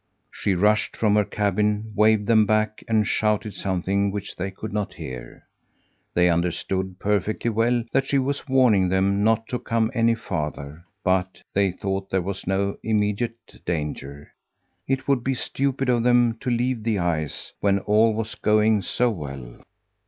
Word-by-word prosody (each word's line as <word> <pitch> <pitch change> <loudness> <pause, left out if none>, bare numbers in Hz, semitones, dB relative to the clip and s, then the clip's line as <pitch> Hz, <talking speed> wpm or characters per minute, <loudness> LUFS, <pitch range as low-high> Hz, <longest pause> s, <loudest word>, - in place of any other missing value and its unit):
She 100 - -1
rushed 105 +4 +2
from 105 -2 +2
her 105 - +4
cabin, 105 +2 -1
waved 105 0 +4
them 110 -1 +4
back, 110 0 0
and 110 -2 +2
shouted 105 0 0
something 95 +1 0
which 100 0 -5
they 95 +2 -3
could 100 +2 -8
not 105 -1 -2
hear. 60 -2 -8 0.7
They 90 0 +4
understood 90 +2 -1
perfectly 105 +3 0
well 115 +2 +1
that 135 0 +1
she 140 - +2
was 140 +4 -1
warning 115 -8 +4
them 100 +2 +1
not 115 +1 +2
to 125 - -2
come 115 0 0
any 115 -1 +3
farther; 75 -6 -5 0.2
but 95 0 0
they 100 0 +3
thought 95 +1 -4
there 95 - +1
was 95 0 -5
no 100 +1 0
immediate 110 +2 -2
danger. 75 -3 -4 0.5
It 130 0 -1
would 135 -4 +2
be 135 +1 0
stupid 135 +1 -1
for 125 -1 +3
them 120 -1 +3
to - - -3
leave 120 0 0
the 110 -1 0
ice 80 -4 -2
when 100 -1 +2
all 105 +2 +3
was 110 0 -3
going 105 0 +2
so 120 +6 0
well! 70 - -8
105 Hz, 160 wpm, -24 LUFS, 95-115 Hz, 0.7 s, her